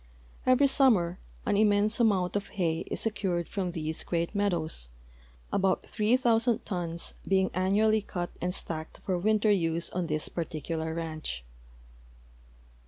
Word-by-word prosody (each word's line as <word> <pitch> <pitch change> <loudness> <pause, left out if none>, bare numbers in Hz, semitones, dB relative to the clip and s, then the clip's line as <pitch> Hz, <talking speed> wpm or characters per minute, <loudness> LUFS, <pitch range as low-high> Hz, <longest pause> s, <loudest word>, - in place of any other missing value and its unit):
Every 255 +2 +5
summer 220 -11 +4 0.3
an 205 - +1
immense 210 +1 +3
amount 200 -6 +2
of 200 -1 -1
hay 165 -4 0
is - - -2
secured 190 -6 -1
from 185 -3 -2
these 160 -2 -2
great 170 +1 -1
meadows, 170 - 0 0.6
about 190 -1 +1
three 220 +3 +2
thousand 235 -2 +2
tons 170 -3 -2
being 190 -1 +2
annually 210 +4 +3
cut 175 -3 -4
and 180 - 0
stacked 160 -3 -5
for 185 - 0
winter 215 +2 +3
use 165 -3 0
on 180 -2 -2
this 155 0 -1
particular 160 0 -3
ranch. 155 - -4
185 Hz, 135 wpm, -29 LUFS, 165-210 Hz, 0.6 s, Every